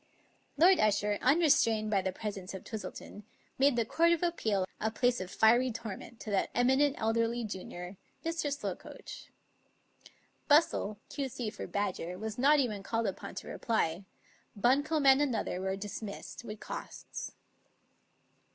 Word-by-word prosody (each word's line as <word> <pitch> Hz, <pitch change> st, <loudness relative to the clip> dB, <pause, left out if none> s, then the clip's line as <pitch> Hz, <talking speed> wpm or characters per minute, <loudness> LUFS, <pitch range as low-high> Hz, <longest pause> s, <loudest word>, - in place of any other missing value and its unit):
Lord 360 Hz, +5 st, +6 dB
Usher, 205 Hz, -1 st, +2 dB
unrestrained 250 Hz, -7 st, +3 dB
by 195 Hz, -2 st, +3 dB
the 190 Hz, 0 st, -1 dB
pres 210 Hz, +2 st, -4 dB
ence 190 Hz, 0 st, -7 dB
of 190 Hz, -, -8 dB
Twistleton, 215 Hz, -1 st, -7 dB, 0.4 s
made 275 Hz, -1 st, +5 dB
the 230 Hz, -1 st, +1 dB
Court 335 Hz, +8 st, +3 dB
of 340 Hz, -, -1 dB
Appeal 220 Hz, -, +1 dB
a 220 Hz, -, 0 dB
place 245 Hz, 0 st, +1 dB
of 185 Hz, -, -5 dB
fiery 240 Hz, +5 st, +4 dB
torment 225 Hz, 0 st, -7 dB
to 215 Hz, -, -5 dB
that 195 Hz, -, +1 dB
eminent 265 Hz, +3 st, +3 dB
elderly 230 Hz, +2 st, 0 dB
junior, 185 Hz, -2 st, -7 dB, 0.3 s
Mr. 325 Hz, -3 st, -1 dB
Slokoach. 285 Hz, -, -6 dB, 1.2 s
Bustle, 290 Hz, -9 st, +3 dB
Q,C. 255 Hz, -5 st, -3 dB
for 210 Hz, -, -7 dB
Badger, 185 Hz, -3 st, -2 dB
was 220 Hz, +3 st, -5 dB
not 290 Hz, +3 st, +5 dB
even 215 Hz, -7 st, 0 dB
called 225 Hz, +3 st, -1 dB
upon -, -, -4 dB
to -, -, -7 dB
reply; 195 Hz, -6 st, -1 dB, 0.5 s
Buncombe 285 Hz, +7 st, +2 dB
and 270 Hz, +1 st, +7 dB
Another 235 Hz, -9 st, -1 dB
were 190 Hz, 0 st, -1 dB
dismissed, 205 Hz, +3 st, -7 dB
with 215 Hz, -2 st, -7 dB
costs. -, -, -7 dB
225 Hz, 140 wpm, -31 LUFS, 205-270 Hz, 1.2 s, and